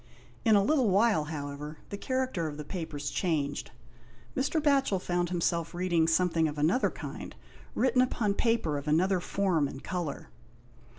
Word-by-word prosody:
In 220 -3 +5
a 200 - +5
little 260 -1 +3
while, 195 -5 +3
however, 150 0 -6
the - - -4
character 255 -8 -1
of 145 -1 -6
the 150 - -5
papers 145 -5 -4
changed. 145 -6 -1 0.7
Mr, 290 +4 +1
Batohel 275 -8 +3
found 175 -1 -1
him 175 -1 -1
self 170 0 0
reading 175 -2 +2
something 165 -1 +2
of 150 0 -5
another 165 - +2
kind, - - -8 0.4
written 255 0 +3
upon 225 -5 +1
paper 205 - +1
of 140 - -10
another 180 +5 +3
form 180 -5 +1
and 135 - -9
colour. 170 - -4
175 Hz, 160 wpm, -29 LUFS, 155-215 Hz, 0.7 s, In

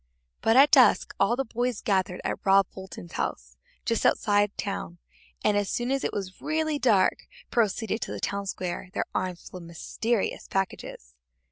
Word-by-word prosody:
But 225 - +3
at 280 +2 +7
dusk - - +5
all 235 - +3
the 270 +2 -1
boys 240 0 -2
gathered 190 -3 0
at - - -3
Rob 195 0 +5
Fulton's 190 - -10
house, - - -4 0.3
just 230 -1 0
outside 205 -1 +3
town, 195 -3 -4 0.5
and 210 - +3
as 205 -1 0
soon 245 +2 -1
as 275 0 0
it - - 0
was 190 -2 -6
really 310 -1 0
dark 215 -8 +2 0.2
proceeded 220 0 0
to - - -4
the - - -5
town 200 0 -2
square, 180 -1 -4
their - - -1
arms 185 -2 -3
full 185 - -9
of - - -11
mysterious 210 +6 -2
packages. 180 - -4
205 Hz, 170 wpm, -27 LUFS, 185-235 Hz, 0.5 s, at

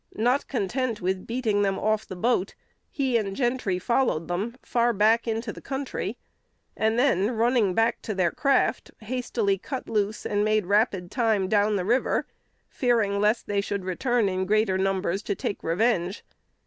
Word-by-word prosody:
Not 245 +5 +1
content 240 0 -2
with 185 +1 -2
beating 230 -4 0
them 195 -1 +1
off 215 0 0
the 185 - -7
boat, 195 0 0 0.3
he 265 -4 0
and 200 -3 -2
Gentry 240 -7 0
followed 185 -5 0
them 200 +7 -3
far 240 0 +1
back 220 +3 +3
into 225 0 -2
the - - -11
country, 270 0 -4 0.6
and 220 +1 +1
then, 225 -6 +3
running 230 -4 +2
back 225 +1 +1
to 215 - -4
their 180 -3 +2
craft, 275 -3 +1
hastily 220 -4 -1
cut 265 +5 -6
loose 210 -1 -1
and 205 0 +1
made 215 -2 +2
rapid 200 -2 +1
time 220 -6 +1
down 210 +1 +2
the 185 -3 -1
river, 240 +6 +1 0.4
fearing 225 -6 +1
lest 210 +3 +2
they 200 -1 0
should 200 -1 -4
return 235 +4 +1
in 185 0 -1
greater 215 -1 +2
numbers 195 0 0
to 200 - -2
take 200 - -4
revenge. 185 +1 0
215 Hz, 165 wpm, -26 LUFS, 195-240 Hz, 0.6 s, back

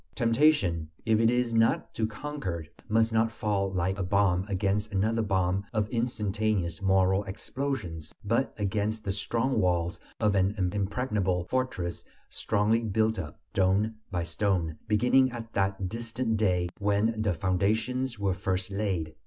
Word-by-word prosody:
Temptation, 115 - +3 0.2
if 110 -1 +3
it 115 0 +4
is 125 -1 +1
not 115 0 +2
to 110 - 0
conquer, 105 - -5 0.2
must 115 +1 +3
not 115 0 +3
fall 100 -3 -1
like 95 +1 -1
a - - 0
bomb 95 -1 +2
against 100 +2 0
another 110 +4 +1
bomb 95 -2 +1
of 105 -1 +1
instantaneous 110 -7 -1
moral 95 0 +3
explosions, 95 - -4
but 115 +6 +1
against 105 +1 -1
the 100 - -1
strong 115 +5 0
walls 90 0 0 0.2
of 105 -2 +2
an 95 +1 +2 0.2
impregnable 100 -3 0
fortress 125 -10 -2 0.3
strongly 110 +2 +1
built 110 -1 0
up, 75 -4 -7
stone 100 +3 +2 0.2
by 90 -3 -1
stone, 85 -2 0
beginning 125 +5 +4
at 115 -1 -8
that 95 -1 0
distant 115 +2 -2
day 90 -5 +2
when 105 +2 +1
the 100 -5 +1
foundations 110 +8 0
were 100 -2 0
first 95 0 -2
laid. 95 -6 -2
105 Hz, 145 wpm, -28 LUFS, 95-115 Hz, 0.3 s, it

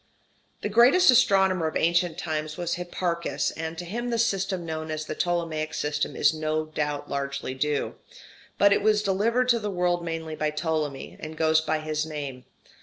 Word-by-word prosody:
The - - -1
greatest 250 - +6
astronomer 190 -7 +4
of 155 - -1
ancient 170 0 +2
times 155 -2 -3
was 175 -1 -2
Hipparchus, 175 -1 -2
and 160 +1 -5
to 175 - -5
him 240 +7 -3
the 235 - 0
system 195 -5 0
known 160 -1 -4
as 155 0 -3
the - - -4
Ptolemaic 165 -2 -1
system 150 0 -2
is 145 - +3
no 155 0 -1
doubt 150 -2 -3
largely 140 -1 -3
due. 145 +2 -1 0.6
But 200 0 +6
it - - +1
was 210 0 +3
delivered 225 +6 +1
to 235 -1 +4
the 210 -1 -3
world 175 -2 0
mainly 165 -1 -4
by 155 0 0
Ptolemy, 150 -2 -3
and 155 0 -7
goes 160 0 +3
by 155 0 -1
his 155 0 -1
name. 145 -5 -6
160 Hz, 180 wpm, -26 LUFS, 155-190 Hz, 0.6 s, greatest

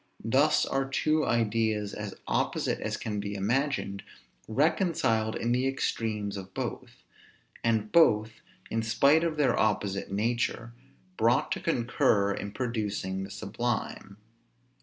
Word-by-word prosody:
Thus 140 +7 +3
are 135 0 -1
two 155 +3 +1
ideas 110 -2 0
as 105 -2 -6
opposite - - 0
as - - -3
can 105 -2 -3
be 100 0 -4
imagined 110 -1 -1 0.5
reconciled 115 - +1
in 120 - -1
the 125 +2 +2
extremes 110 -6 -2
of 95 0 -9
both; - - -5 0.6
and 110 -2 +1
both, 110 -10 +4 0.3
in 115 - 0
spite 140 +8 +4
of 165 -2 -1
their 135 -5 +3
opposite 100 -3 0
nature, 115 +2 -1 0.4
brought 115 +2 +2
to - - -1
concur 110 -4 +2
in 100 +1 -5
producing 105 -6 -2
the 95 - -7
sublime. 105 0 -4
110 Hz, 125 wpm, -28 LUFS, 100-125 Hz, 0.6 s, both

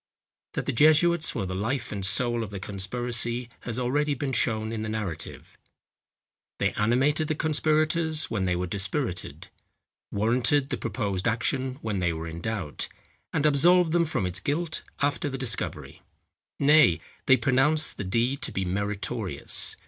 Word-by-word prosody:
That - - -3
the - - -1
jesuits 155 +5 +4
were 105 -6 -1
the 95 - -4
life 115 +6 -2
and 100 -2 -4
soul 120 +4 +2
of 110 - -4
the 100 -1 -6
conspiracy 120 +4 -1
has 120 -1 -5
already 145 +4 +1
been 135 0 -3
shown 110 -3 +1
in 110 -1 -3
the 110 - -3
narrative. 105 -7 -5 1.0
They - - +1
animated 135 +8 +2
the 155 - 0
conspirators 155 +1 +1
when 100 -4 -2
they 90 -1 +1
were 90 +1 -1
dispirited,—warranted 115 - -2
the - - -1
proposed 100 -6 -2
action 130 +3 0
when 105 -3 -1
they 85 -2 +1
were 80 +1 -5
in 85 +1 -7
doubt,—and 110 - -4
absolved 170 +4 +4
them 170 0 +3
from 150 - -1
its 90 -1 -2
guilt 155 - -2 0.2
after 145 0 0
the 135 - -4
discovery. 125 -4 -3 0.6
Nay, 145 - +5 0.3
they 130 - +7
pronounced 135 +6 +2
the - - -3
deed 120 +8 0
to - - 0
be 95 - -2
meritorious. 100 - -2
120 Hz, 150 wpm, -27 LUFS, 100-145 Hz, 1.0 s, they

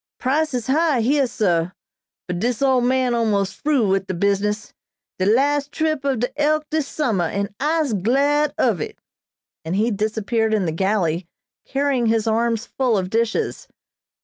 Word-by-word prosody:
"Prices 275 -2 0
high 295 -2 +2
heah, 275 +3 +2
sah, 180 -7 0 0.5
but 180 -1 -4
dis 245 +4 -1
old 260 -2 +3
man 255 -1 +2
almos' 210 -4 +1
fru 285 -8 +1
wid 195 0 0
de 185 - -3
business; 200 +3 -1 0.5
de 185 - +1
las' 280 +6 +2
trip 310 0 -1
ob 270 -5 0
de 260 +4 -2
'Elk' 305 +1 +2
dis 310 -2 0
summah, 220 - 0
an' 200 +2 -3
I'se 300 -3 +1
glad 280 +9 +2
of 215 -10 +1
it," - - -5 0.7
and 165 +3 -3
he 220 +4 +1
disappeared 220 +1 0
in 200 -4 0
the 160 - -1
galley 175 -1 0 0.4
carrying 275 -3 0
his 225 -1 +1
arms 230 +1 0
full 250 -5 0
of 185 0 -3
dishes. 230 0 -1
235 Hz, 160 wpm, -21 LUFS, 200-275 Hz, 0.7 s, old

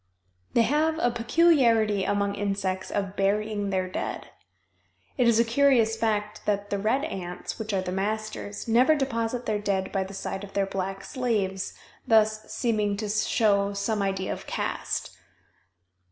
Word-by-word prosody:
They 235 - +5
have 310 +5 +1
a 245 -7 +2
peculiarity 230 - +3
among 200 0 0
insects 195 -2 -2
of 195 -1 -2
burying 205 +1 0
their 185 -1 0
dead. 185 - -4 0.9
It 245 - +3
is 230 -1 +4
a - - +6
curious 235 -2 +3
fact 215 -2 -2
that 205 -1 -1
the 200 - 0
red 225 +8 +1
ants, 180 +2 -5
which 220 0 -3
are 190 -2 0
the 180 - -4
masters, 210 +2 -3
never 250 +7 +5
deposit 245 -3 -2
their 210 -1 0
dead 195 -2 -1
by 195 -1 0
the 195 +1 -9
side 195 0 -4
of 200 - -10
their 200 -1 +1
black 195 0 -4
slaves, 210 -8 -2 0.3
thus 215 -1 +3
seeming 210 -4 0
to 215 0 -3
show 205 -1 +2
some 205 +1 -1
idea 195 -1 -1
of - - -9
caste. - - -3
210 Hz, 155 wpm, -26 LUFS, 195-230 Hz, 0.9 s, a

